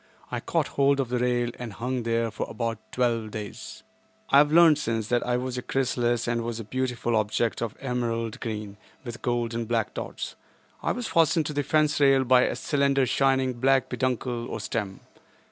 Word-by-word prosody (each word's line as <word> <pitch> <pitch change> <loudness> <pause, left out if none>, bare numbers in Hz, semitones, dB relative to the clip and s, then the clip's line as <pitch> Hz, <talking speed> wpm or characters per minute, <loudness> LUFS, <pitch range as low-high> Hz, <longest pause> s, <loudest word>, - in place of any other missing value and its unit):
I - - -2
caught - - -1
hold 140 0 +2
of 130 -3 -1
the 125 0 0
rail 120 -1 +1
and 120 -4 -6
hung 125 +4 -2
there 115 0 0
for 110 - -4
about 115 -2 -3
twelve 115 -3 0
days. 110 +2 -8 0.5
I 140 - +8
have 150 +1 +4
learned 160 -2 +6
since, 115 -5 -2
that 120 -1 +2
I 125 0 +2
was 125 0 -3
a - - -5
chrysalis 120 -3 0
and 115 0 0
was 115 0 -4
a - - -5
beautiful 125 0 -2
object 110 +2 0
of 115 -3 -3
emerald 120 -2 -2
green, 105 -3 -5 0.3
with 120 -1 -7
gold 120 -1 -1
and 115 -1 -3
black 115 -2 0
dots. - - -5 0.4
163 - - -2
I - - +3
was 245 -1 -4
fastened 165 -1 +3
to 150 - -3
the 145 - 0
fence 150 +1 +2
rail 135 -2 +5
by 125 0 +5
a - - -1
slender 140 -2 +1
shining 130 0 +2
black 130 0 +3
peduncle, 125 -2 -2
or - - -4
stem. 105 -2 -4
120 Hz, 195 wpm, -26 LUFS, 115-135 Hz, 0.5 s, I